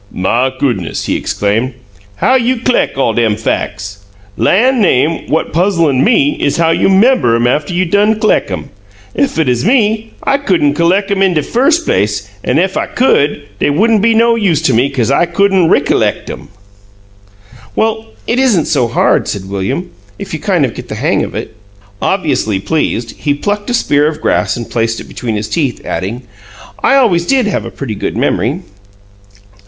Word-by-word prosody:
"My 115 Hz, +8 st, 0 dB
goo'ness!" 120 Hz, -, -2 dB
he -, -, -1 dB
exclaimed. 110 Hz, +6 st, -1 dB, 0.4 s
"How 255 Hz, -, +1 dB
you 255 Hz, 0 st, +2 dB
c'leck 250 Hz, -, 0 dB
all' 125 Hz, -4 st, +1 dB
dem 110 Hz, -2 st, +1 dB
fac's? 100 Hz, -2 st, -3 dB, 0.4 s
Lan' 230 Hz, -, +2 dB
name! 160 Hz, -3 st, +1 dB
What 160 Hz, -, -1 dB
puzzlin' 165 Hz, -7 st, +2 dB
ME 290 Hz, +6 st, +2 dB
is -, -, +1 dB
how 165 Hz, -1 st, +2 dB
you 165 Hz, -, +2 dB
'member 195 Hz, -, +3 dB
'em 115 Hz, +1 st, +1 dB
after 145 Hz, +7 st, 0 dB
you 185 Hz, +1 st, +1 dB
done 205 Hz, +4 st, +2 dB
c'leck 215 Hz, -, +1 dB
'em. -, -, -6 dB, 0.4 s
Ef 280 Hz, -, 0 dB
it 160 Hz, -3 st, +1 dB
uz 125 Hz, -1 st, +1 dB
me 220 Hz, 0 st, +1 dB
I 275 Hz, 0 st, +1 dB
couldn't 175 Hz, -, +1 dB
c'leck 185 Hz, +6 st, +1 dB
'em 195 Hz, -1 st, 0 dB
in 190 Hz, -3 st, +2 dB
de 150 Hz, -, +1 dB
firs' 270 Hz, -, +2 dB
place, 105 Hz, -, -1 dB, 0.2 s
an' 125 Hz, -, 0 dB
ef 190 Hz, +3 st, 0 dB
I -, -, -1 dB
could, 145 Hz, -, +1 dB, 0.2 s
dey -, -, +1 dB
wouldn' 215 Hz, +9 st, +2 dB
be 225 Hz, +1 st, +3 dB
no 230 Hz, +1 st, +4 dB
use 195 Hz, -9 st, +1 dB
to 130 Hz, -, +2 dB
me, 125 Hz, +5 st, +2 dB
'cause 130 Hz, -3 st, -1 dB
I 170 Hz, +5 st, +2 dB
couldn't 190 Hz, -1 st, +2 dB
rickalect -, -, +1 dB
'em!" -, -, -9 dB, 1.3 s
"Well, 220 Hz, 0 st, -1 dB, 0.2 s
it 240 Hz, -, 0 dB
isn't 225 Hz, -, +2 dB
so 130 Hz, -5 st, +1 dB
hard," 115 Hz, -, +1 dB
said 95 Hz, -1 st, -4 dB
William, 130 Hz, -, -3 dB, 0.3 s
"if -, -, -8 dB
you -, -, -3 dB
kind -, -, +1 dB
of -, -, -4 dB
get -, -, -9 dB
the -, -, -6 dB
hang -, -, 0 dB
of -, -, -6 dB
it." -, -, -6 dB, 0.5 s
Obviously 135 Hz, -, 0 dB
pleased, 120 Hz, -2 st, -2 dB
he 145 Hz, -2 st, 0 dB
plucked 205 Hz, +7 st, -3 dB
a -, -, -1 dB
spear 145 Hz, -9 st, +2 dB
of 155 Hz, -1 st, -3 dB
grass -, -, 0 dB
and 120 Hz, -, -6 dB
placed 115 Hz, -1 st, -1 dB
it -, -, -7 dB
between 115 Hz, -4 st, -4 dB
his 105 Hz, +1 st, -3 dB
teeth, 140 Hz, -5 st, -1 dB
adding, 115 Hz, +7 st, -4 dB, 0.6 s
"I -, -, +3 dB
always 185 Hz, -11 st, +2 dB
did 265 Hz, -3 st, +2 dB
have 205 Hz, -, -2 dB
a -, -, -5 dB
pretty 130 Hz, -6 st, -6 dB
good 100 Hz, -, -4 dB
memory." 125 Hz, -, 0 dB
165 Hz, 185 wpm, -13 LUFS, -, 1.3 s, no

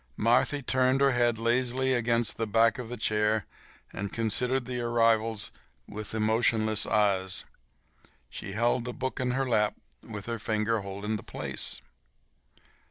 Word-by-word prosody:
Marthy 125 Hz, +5 st, +2 dB
turned 130 Hz, +1 st, +2 dB
her 140 Hz, 0 st, +4 dB
head 120 Hz, -2 st, +2 dB
lazily 125 Hz, +3 st, +1 dB
against 120 Hz, -2 st, +1 dB
the 115 Hz, -, -1 dB
back 115 Hz, +2 st, +3 dB
of 120 Hz, -2 st, -6 dB
the 125 Hz, -, -5 dB
chair 105 Hz, -1 st, +1 dB, 0.5 s
and 100 Hz, 0 st, -4 dB
considered 120 Hz, +3 st, +1 dB
the 125 Hz, 0 st, -4 dB
arrivals 115 Hz, -2 st, +1 dB, 0.4 s
with 105 Hz, +1 st, -6 dB
emotionless 110 Hz, 0 st, +2 dB
eyes. 100 Hz, -3 st, +1 dB, 0.8 s
She 95 Hz, -, -8 dB
held 120 Hz, +2 st, +1 dB
a 125 Hz, -, -4 dB
book 130 Hz, +2 st, -4 dB
in 130 Hz, -1 st, 0 dB
her 130 Hz, +2 st, 0 dB
lap 105 Hz, -3 st, +2 dB, 0.3 s
with 105 Hz, -3 st, -8 dB
her 115 Hz, -1 st, -4 dB
finger 110 Hz, +1 st, 0 dB
holding 100 Hz, +2 st, -4 dB
the -, -, -9 dB
place. -, -, -1 dB
115 Hz, 145 wpm, -28 LUFS, 110-125 Hz, 0.8 s, her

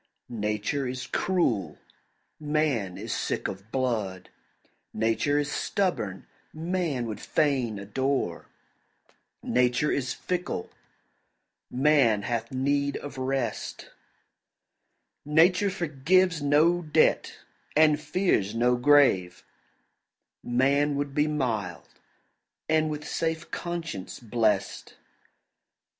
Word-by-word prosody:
Nature 105 Hz, +5 st, -2 dB
is 130 Hz, +1 st, -4 dB
cruel, 115 Hz, -, 0 dB, 0.6 s
man 145 Hz, -11 st, 0 dB
is -, -, -4 dB
sick -, -, -2 dB
of 95 Hz, +3 st, -8 dB
blood; 110 Hz, -8 st, -2 dB, 0.7 s
Nature 115 Hz, +6 st, +1 dB
is 145 Hz, -1 st, -1 dB
stubborn, 110 Hz, -, -1 dB, 0.3 s
man 165 Hz, -6 st, -2 dB
would 110 Hz, -2 st, -5 dB
fain 130 Hz, -8 st, 0 dB
adore; 105 Hz, -1 st, -2 dB, 1.0 s
Nature 125 Hz, +3 st, +2 dB
is 130 Hz, -2 st, -1 dB
fickle, 180 Hz, -, -3 dB, 1.0 s
man 130 Hz, -6 st, +3 dB
hath 115 Hz, +1 st, -3 dB
need 140 Hz, +2 st, 0 dB
of 140 Hz, -2 st, -8 dB
rest; 130 Hz, -3 st, -3 dB, 1.3 s
Nature 170 Hz, +7 st, +4 dB
forgives 175 Hz, 0 st, +1 dB
no 155 Hz, +5 st, +3 dB
debt, 155 Hz, -1 st, +2 dB, 0.4 s
and 150 Hz, -1 st, +5 dB
fears 115 Hz, -, 0 dB
no 120 Hz, +2 st, +3 dB
grave; 125 Hz, -10 st, +4 dB, 1.0 s
Man 140 Hz, +4 st, +2 dB
would 140 Hz, -1 st, -2 dB
be 150 Hz, +1 st, +2 dB
mild, 115 Hz, -, -2 dB, 0.8 s
and 155 Hz, 0 st, +2 dB
with 150 Hz, 0 st, -5 dB
safe 160 Hz, 0 st, -2 dB
conscience 165 Hz, -, -5 dB
blest. 115 Hz, -2 st, -1 dB
135 Hz, 90 wpm, -27 LUFS, 115-155 Hz, 1.3 s, and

